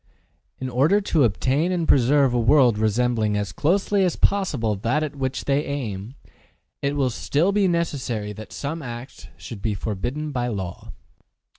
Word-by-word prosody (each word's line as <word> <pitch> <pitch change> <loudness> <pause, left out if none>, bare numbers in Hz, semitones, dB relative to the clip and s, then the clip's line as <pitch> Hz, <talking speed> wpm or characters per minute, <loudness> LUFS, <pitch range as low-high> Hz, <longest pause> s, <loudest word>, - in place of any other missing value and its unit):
In 130 - -3
order 140 +11 +3
to 165 -9 +2
obtain 135 - +1
and 170 -3 -1
preserve 135 0 +4
a 120 - +2
world 120 -2 +4
resembling 110 -1 +1
as 100 -3 -2
closely 195 - +1
as 180 -3 +1
possible 145 - +1
that 120 +10 0
at 150 -2 -4
which 130 -2 -3
they 140 +1 +1
aim, 120 -5 -5 0.7
it 140 +1 -1
will 135 -3 +1
still 155 - +1
be 200 -1 +2
necessary 130 - -2
that 110 +1 -10
some 160 +4 -4
acts 120 0 -8
should 110 -4 -9
be 110 -1 -1
forbidden 120 +10 -3
by 125 -3 -1
law. 95 -7 -5
130 Hz, 160 wpm, -23 LUFS, 115-150 Hz, 0.7 s, preserve